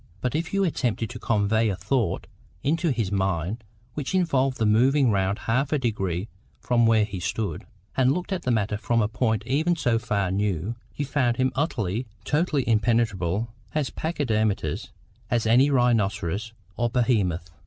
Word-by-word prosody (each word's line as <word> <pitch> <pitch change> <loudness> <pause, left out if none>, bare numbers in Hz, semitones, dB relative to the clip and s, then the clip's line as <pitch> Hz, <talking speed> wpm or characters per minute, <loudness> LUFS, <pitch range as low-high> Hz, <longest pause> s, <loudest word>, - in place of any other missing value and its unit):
But 125 +5 -2
if 165 +3 -2
you 195 0 +2
attempted 120 - -1
to 120 - -7
convey 110 +1 +2
a 100 - -1
thought 125 +3 -1 0.4
into 165 +4 +1
his 115 -8 -1
mind 95 +2 -1 0.3
which 150 +5 -3
involved 135 -8 +2
the 110 - +1
moving 125 +4 +4
round 100 0 +1
half 130 +5 0
a 150 - +3
degree 100 -7 -2 0.3
from 120 -2 +2
where 110 -2 +4
he 100 -3 -6
stood, 95 -1 -3 0.3
and 130 0 +4
looking 180 +5 -1
at - - -13
the 125 - -2
matter 105 -3 +1
from 115 +3 0
a - - +1
point 110 -1 0
even 155 +7 +1
so 120 -8 +1
far 100 -6 -1
new, 100 +1 -1 0.2
you 145 - -2
found 130 -4 +1
him 130 0 +2
utterly, 120 - -1 0.2
totally 150 -3 +1
impenetrable, 110 -2 +1 0.2
as 150 -4 0
pachydermatous 110 - -1 0.4
as 120 -2 +1
any 125 +5 +5
rhinoceros 110 - +1 0.3
or 120 0 +1
behemoth. 100 -9 +1
115 Hz, 165 wpm, -25 LUFS, 105-130 Hz, 0.4 s, any